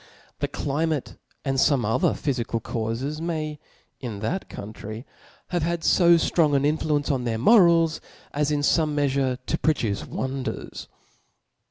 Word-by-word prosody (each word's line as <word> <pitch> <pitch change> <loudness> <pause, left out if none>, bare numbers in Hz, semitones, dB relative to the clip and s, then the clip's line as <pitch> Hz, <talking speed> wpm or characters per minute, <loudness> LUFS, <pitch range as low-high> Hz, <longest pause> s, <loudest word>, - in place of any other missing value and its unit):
The - - 0
climate 150 0 -2 0.3
and 135 -1 0
fome 135 -6 +3
other 110 - +2
phyfical 120 -5 -2
caufes 115 +7 -3
may, 155 -3 -3 0.4
in 120 -6 -5
that 180 - -3
coun 105 +2 -8
try, 110 +4 -8 0.4
have 175 -1 0
had 170 +1 -1
fo 170 -2 +5
ftrong 160 -3 +2
an 140 0 +2
influence 150 -1 +1
on 130 -3 -1
their 115 -2 -1
mo 215 - +6
rals, 165 -3 +4 0.3
as 145 0 +1
in 150 -1 0
fome 150 +1 +2
meafure 135 -3 +1
to 160 - -1
produce 115 -10 0
wonders. 130 0 -5
145 Hz, 150 wpm, -25 LUFS, 125-160 Hz, 0.4 s, mo